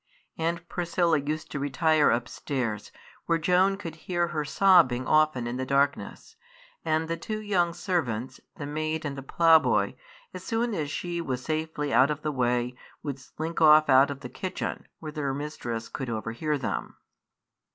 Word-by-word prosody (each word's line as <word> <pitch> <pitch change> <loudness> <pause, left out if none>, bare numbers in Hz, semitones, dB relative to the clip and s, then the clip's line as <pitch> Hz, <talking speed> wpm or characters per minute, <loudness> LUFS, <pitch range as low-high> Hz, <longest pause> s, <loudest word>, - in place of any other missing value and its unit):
Aunt 170 +1 -2
Priscilla 170 -2 +1
used 150 +2 -4
to 145 - -3
retire 150 +2 +3
upstairs, 120 -2 -2 0.4
where 165 - +3
Joan 180 +4 +3
could 170 -5 -7
hear 175 +1 -2
her 155 -3 -2
sobbing 150 -7 +4
often 155 -5 +3
in 120 +1 -3
the 130 - -2
darkness; 140 - -1 0.5
and 160 0 0
the 165 - -1
two 215 +4 -4
young 190 -5 +1
servants, 130 - -2 0.2
the 150 - -6
maid 155 +2 -3
and 140 -2 -3
the 135 - -6
ploughboy, 160 +3 +4 0.4
as - - -8
soon 230 0 -1
as 155 -7 -2
she 175 +3 -3
was 130 -5 -3
safely 155 -2 -2
out 135 +3 +5
of 150 0 -3
the 150 - 0
way, 125 -2 0 0.3
would 140 -3 -4
slink 160 +5 -5
off 155 -1 +7
out 135 +2 +6
of 140 -1 -6
the 125 - -7
kitchen, 185 +5 -5
where 155 -2 -7
their 145 -3 -2
mistress 120 -6 -5
could 130 -4 -5
overhear 115 +7 -2
them. 135 - -4
155 Hz, 165 wpm, -27 LUFS, 135-165 Hz, 0.5 s, off